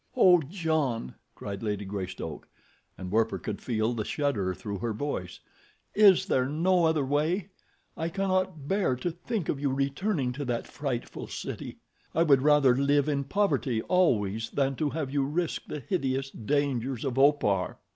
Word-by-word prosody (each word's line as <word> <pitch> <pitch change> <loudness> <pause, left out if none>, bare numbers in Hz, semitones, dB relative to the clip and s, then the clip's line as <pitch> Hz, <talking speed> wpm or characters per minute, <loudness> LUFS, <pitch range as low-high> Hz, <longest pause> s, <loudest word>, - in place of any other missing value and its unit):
"Oh, 180 -7 +7
John," 155 - -1 0.2
cried 100 -1 -6
Lady 105 -2 -2
Greystoke, 95 -5 -5 0.5
and 90 -1 -6
Werper 110 +1 +2
could 105 -2 -5
feel 115 -1 0
the 110 -2 -2
shudder 105 -10 -1
through 100 -2 -5
her 115 +3 -2
voice, 105 - -4 0.5
"is 205 -4 +6
there 130 0 +1
no 170 +4 +2
other 160 -3 +2
way? 160 +7 0 0.5
I 165 +1 -2
cannot 185 -5 -1
bear 190 -9 +1
to 170 +8 -3
think 175 +2 -4
of 140 - -1
you 140 -1 0
returning 140 +2 0
to 145 +2 -5
that 120 -2 -2
frightful 135 -5 -4
city. - - -6 0.4
I 165 - +4
would 140 -5 +5
rather 145 -3 +5
live 140 +1 +2
in 140 -2 0
poverty 140 - 0
always 115 - +1
than 135 -1 0
to 150 - 0
have 145 -3 -4
you 140 -1 +2
risk 160 +4 -2
the 150 - -5
hideous 135 -4 -1
dangers 135 0 -1
of 135 -1 -1
Opar." 135 -10 +3
140 Hz, 160 wpm, -28 LUFS, 115-160 Hz, 0.5 s, Oh